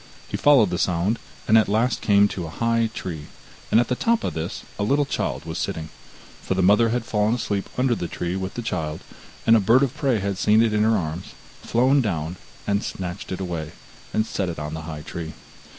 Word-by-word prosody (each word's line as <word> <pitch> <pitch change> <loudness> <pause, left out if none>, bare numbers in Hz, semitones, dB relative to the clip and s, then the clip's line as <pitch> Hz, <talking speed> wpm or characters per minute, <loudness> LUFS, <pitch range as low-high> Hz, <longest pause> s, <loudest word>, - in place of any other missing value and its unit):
He - - -5
followed 135 -9 +5
the 90 - -1
sound, 95 +6 +1 0.3
and 110 +1 +7
at 110 - +1
last 115 +5 +1
came 100 -1 +5
to 90 -4 -4
a - - -7
high 115 +5 +1
tree, 80 -9 -6 0.4
and 110 - +5
at 120 - +2
the - - 0
top 230 - +1
of - - -2
this 80 +1 -4 0.2
a - - +1
little 140 +7 +2
child - - -2
was - - -4
sitting, 80 -1 -3 0.5
for 95 - -2
the 95 - +1
mother 105 +5 +5
had 120 0 -1
fallen 105 +1 +1
asleep 100 -4 -2
under 125 -1 +3
the 90 -6 -3
tree 90 +1 -3
with 95 0 -4
the 120 - -4
child, 80 -7 -3 0.4
and 115 - +7
a - - +6
bird 115 +7 +4
of 135 -2 -1
prey 135 -5 +1
had 100 -1 -2
seen 110 +3 +5
it 110 -2 +1
in 105 - +2
her 110 0 +4
arms, 80 0 -5 0.3
had - - -13
flown 130 +4 +4
down, 85 -6 -2 0.4
snatched 95 -3 -5
it 95 - -3
away, 85 -5 -4 0.4
and 110 - +1
set 95 -4 -2
it 85 - -5
on 75 +1 -5
the 80 - -4
high 75 -2 -6
tree. 80 0 -6
100 Hz, 225 wpm, -23 LUFS, 85-115 Hz, 0.5 s, and